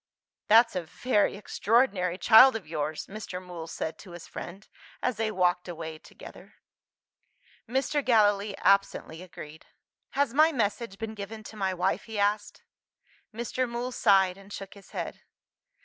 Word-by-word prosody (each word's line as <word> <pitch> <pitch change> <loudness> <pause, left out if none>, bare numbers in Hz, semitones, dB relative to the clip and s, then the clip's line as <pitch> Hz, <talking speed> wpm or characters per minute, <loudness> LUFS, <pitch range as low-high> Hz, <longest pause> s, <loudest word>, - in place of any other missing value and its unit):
"That's 230 0 +6
a 180 - 0
very 200 +6 0
extraordinary 205 -4 +1
child 225 +6 +7
of 220 - -5
yours," 155 0 -3
Mr. 195 -3 -7
Mool 175 -3 -8
said 160 - -5
to 185 -4 -12
his 175 -1 -9
friend, 190 +4 -9 0.4
as 250 -4 0
they 220 0 0
walked 180 -3 +1
away 160 -2 -7
together. - - -14 1.1
Mr. 270 +3 0
Gallilee 205 -4 +3
absently 195 -4 +1
agreed. 160 -4 -11 0.5
"Has 280 -4 +1
my 310 +3 +5
message 215 -5 -2
been 220 0 -5
given 215 +1 -8
to 220 - -11
my 190 -3 -1
wife?" 180 +2 -1
he 220 -2 -7
asked. 205 +1 -1 0.7
Mr. 240 +2 -2
Mool 240 +2 -3
sighed 195 -6 +3
and 195 +1 -16
shook 195 -1 -8
his 200 -1 -16
head. - - -6
200 Hz, 150 wpm, -28 LUFS, 180-225 Hz, 1.1 s, child